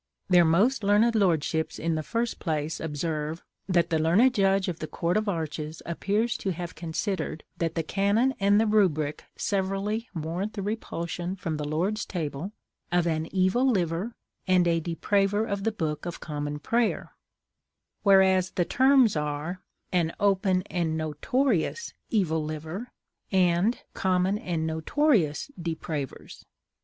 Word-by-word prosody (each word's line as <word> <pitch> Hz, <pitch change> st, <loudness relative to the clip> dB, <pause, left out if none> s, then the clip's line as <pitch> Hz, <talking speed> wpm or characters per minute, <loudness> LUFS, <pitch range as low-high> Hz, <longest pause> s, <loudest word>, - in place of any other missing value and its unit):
Their 175 Hz, -2 st, +6 dB
most 210 Hz, +10 st, +3 dB
learned 210 Hz, +4 st, +4 dB
lordships 165 Hz, -6 st, +1 dB
in 165 Hz, +1 st, -1 dB
the 155 Hz, -, -1 dB
first 230 Hz, +8 st, -2 dB
place 155 Hz, -2 st, -2 dB
observe 155 Hz, +1 st, -3 dB, 0.3 s
that 175 Hz, -2 st, +2 dB
the 160 Hz, -, +2 dB
learned 195 Hz, +11 st, +4 dB
judge 195 Hz, -3 st, +2 dB
of 175 Hz, -3 st, -3 dB
the 155 Hz, -, -4 dB
Court 170 Hz, +3 st, -1 dB
of 215 Hz, 0 st, +1 dB
Arches 155 Hz, -3 st, -4 dB
appears 205 Hz, +7 st, 0 dB
to 195 Hz, -, -3 dB
have 175 Hz, -1 st, -4 dB
considered 170 Hz, 0 st, -3 dB
that 165 Hz, -1 st, -1 dB
the 165 Hz, -, 0 dB
canon 205 Hz, +9 st, +2 dB
and 200 Hz, +1 st, +4 dB
the 225 Hz, -, +3 dB
rubric 175 Hz, -9 st, +1 dB
severally 200 Hz, +3 st, -1 dB
warrant 170 Hz, +7 st, -3 dB
the 200 Hz, -, -4 dB
repulsion 180 Hz, -4 st, -3 dB
from 165 Hz, -4 st, -3 dB
the 150 Hz, -1 st, -3 dB
Lord's 185 Hz, +8 st, -1 dB
table 160 Hz, +1 st, -4 dB, 0.4 s
of 175 Hz, -1 st, +2 dB
"an 160 Hz, -1 st, 0 dB
evil 190 Hz, +6 st, +2 dB
liver," 185 Hz, +1 st, -1 dB, 0.3 s
and 180 Hz, -1 st, +4 dB
"a 165 Hz, -1 st, +2 dB
depraver 195 Hz, +5 st, +1 dB
of 200 Hz, -2 st, -3 dB
the 225 Hz, -, +2 dB
Book 160 Hz, -6 st, -3 dB
of 175 Hz, -, -5 dB
Common 150 Hz, -1 st, -4 dB
Prayer," 230 Hz, +9 st, 0 dB, 0.9 s
whereas 190 Hz, -2 st, +5 dB
the 175 Hz, -, 0 dB
terms 260 Hz, -3 st, +4 dB
are 150 Hz, +4 st, -3 dB, 0.3 s
"an 170 Hz, -2 st, +1 dB
open 190 Hz, -2 st, +2 dB
and 165 Hz, -4 st, -2 dB
notorious 195 Hz, -, 0 dB, 0.2 s
evil 160 Hz, -8 st, +1 dB
liver," 160 Hz, +9 st, -5 dB, 0.4 s
and 185 Hz, +4 st, +2 dB
"common 190 Hz, +2 st, +1 dB
and 165 Hz, -5 st, -2 dB
notorious 160 Hz, -, +1 dB
depravers." 160 Hz, -4 st, -5 dB
180 Hz, 145 wpm, -27 LUFS, 160-205 Hz, 0.9 s, Their